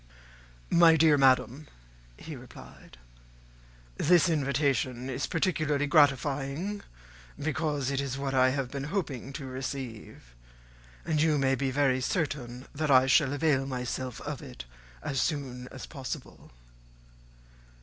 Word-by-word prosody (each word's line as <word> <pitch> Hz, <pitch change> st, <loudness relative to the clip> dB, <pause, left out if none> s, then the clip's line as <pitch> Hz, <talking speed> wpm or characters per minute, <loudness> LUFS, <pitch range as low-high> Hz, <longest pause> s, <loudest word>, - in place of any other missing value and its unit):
"My 170 Hz, -1 st, +7 dB
dear 160 Hz, -1 st, +5 dB
madam," 130 Hz, +1 st, +2 dB, 0.5 s
he 160 Hz, -, -8 dB
replied, 120 Hz, -, -14 dB, 1.0 s
"this 175 Hz, +2 st, +4 dB
invitation 135 Hz, -4 st, 0 dB
is 130 Hz, +2 st, -2 dB
particularly 155 Hz, -4 st, 0 dB
gratifying, 145 Hz, +5 st, +1 dB, 0.6 s
because 150 Hz, -3 st, -1 dB
it 140 Hz, 0 st, 0 dB
is 135 Hz, -1 st, -3 dB
what 135 Hz, -1 st, -3 dB
I 130 Hz, -1 st, +4 dB
have 130 Hz, -1 st, -2 dB
been 140 Hz, -1 st, -4 dB
hoping 145 Hz, -, -3 dB
to 135 Hz, -, -6 dB
receive; 130 Hz, -, -7 dB, 0.7 s
and 155 Hz, -2 st, +1 dB
you 155 Hz, -1 st, +3 dB
may 135 Hz, -1 st, +2 dB
be 135 Hz, 0 st, 0 dB
very 130 Hz, -1 st, +1 dB
certain 130 Hz, -5 st, -3 dB
that 155 Hz, +1 st, -2 dB
I 130 Hz, -1 st, +6 dB
shall 135 Hz, +1 st, +4 dB
avail 145 Hz, -2 st, +1 dB
myself 125 Hz, -1 st, -4 dB
of 145 Hz, -2 st, -5 dB
it 130 Hz, -, -9 dB, 0.4 s
as 135 Hz, -2 st, -1 dB
soon 130 Hz, -4 st, -3 dB
as 130 Hz, 0 st, -9 dB
possible." 135 Hz, -4 st, -8 dB
140 Hz, 125 wpm, -29 LUFS, 130-150 Hz, 1.0 s, My